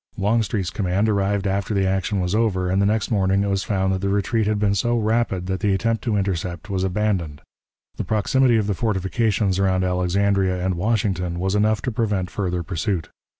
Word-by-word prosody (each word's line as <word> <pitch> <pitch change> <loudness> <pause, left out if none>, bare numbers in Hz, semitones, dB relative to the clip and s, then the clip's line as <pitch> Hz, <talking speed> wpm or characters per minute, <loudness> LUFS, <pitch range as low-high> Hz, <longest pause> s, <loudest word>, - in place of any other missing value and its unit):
Longstreet's 105 -3 0
command 100 +1 0
arrived 100 -1 0
after 100 +2 -1
the 95 -1 +2
action 95 +1 0
was 90 +1 -1
over, 95 -5 +1
and 95 +1 +2
the 100 - +3
next 110 +2 0
morning 100 -1 +2
it 100 - -1
was 95 -1 0
found 95 -2 0
that 95 - -1
the 100 +1 -1
retreat 100 +2 0
had 105 0 +1
been 100 -1 +1
so 120 +5 +1
rapid 110 -4 0
that 95 0 -2
the 100 -2 +1
attempt 115 +2 -1
to 110 -4 +1
intercept 95 0 -3
was 95 -1 -1
abandoned. 95 -6 -1 0.6
The - - -2
proximity 120 +3 +2
of 105 - +1
the 100 - 0
fortifications 100 -1 0
around 95 -1 +2
Alexandria 95 +1 +1
and 95 - +1
Washington 90 -2 -1
was 95 +2 -1
enough 105 +1 +1
to 125 - -1
prevent 105 -5 -1
further 90 -3 -2
pursuit. 90 -1 -2
100 Hz, 195 wpm, -22 LUFS, 95-105 Hz, 0.6 s, the